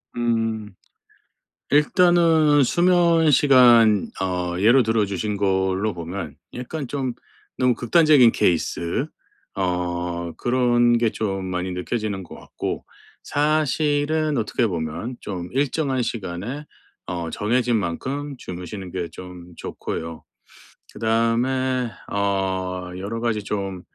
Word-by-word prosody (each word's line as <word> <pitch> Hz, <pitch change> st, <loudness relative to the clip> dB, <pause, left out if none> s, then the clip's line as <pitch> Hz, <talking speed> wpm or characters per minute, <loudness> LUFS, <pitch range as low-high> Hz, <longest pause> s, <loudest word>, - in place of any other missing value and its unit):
음. 115 Hz, -3 st, -1 dB, 1.0 s
일단은 160 Hz, -1 st, +4 dB
수면 170 Hz, +1 st, +3 dB
시간 120 Hz, -7 st, +5 dB
어 90 Hz, -2 st, -2 dB
예로 120 Hz, +6 st, +5 dB
들어 110 Hz, -1 st, +1 dB
주신 100 Hz, +1 st, -3 dB
걸로 95 Hz, +1 st, 0 dB
보면 85 Hz, -2 st, -6 dB, 0.2 s
약간 130 Hz, +3 st, -5 dB
좀 130 Hz, -3 st, -3 dB, 0.4 s
너무 125 Hz, -1 st, +3 dB
극단적인 130 Hz, 0 st, +5 dB
케이스 85 Hz, -3 st, 0 dB, 0.5 s
어 90 Hz, -2 st, -2 dB
그런 120 Hz, -1 st, +3 dB
게 115 Hz, -2 st, +2 dB
좀 95 Hz, -4 st, -3 dB
많이 90 Hz, 0 st, -3 dB
느껴지는 100 Hz, +2 st, -3 dB
것 -, -, -11 dB
같고 -, -, -5 dB, 0.4 s
사실은 150 Hz, 0 st, +1 dB
어떻게 115 Hz, +1 st, 0 dB
보면 85 Hz, +7 st, -4 dB
좀 90 Hz, -3 st, -6 dB
일정한 135 Hz, -1 st, 0 dB
시간에 115 Hz, +6 st, -5 dB, 0.4 s
어 85 Hz, -2 st, -4 dB
정해진 120 Hz, +3 st, +1 dB
만큼 135 Hz, +10 st, -3 dB
주무시는 90 Hz, 0 st, -7 dB
게 90 Hz, -2 st, -4 dB
좀 90 Hz, 0 st, -11 dB
좋고요. 80 Hz, 0 st, -6 dB, 0.7 s
그다음에 120 Hz, +3 st, 0 dB, 0.2 s
어 95 Hz, -2 st, -1 dB
여러 105 Hz, +4 st, -4 dB
가지 110 Hz, -3 st, -1 dB
좀 95 Hz, -3 st, -4 dB
110 Hz, 215 characters per minute, -22 LUFS, 95-130 Hz, 1.0 s, 시간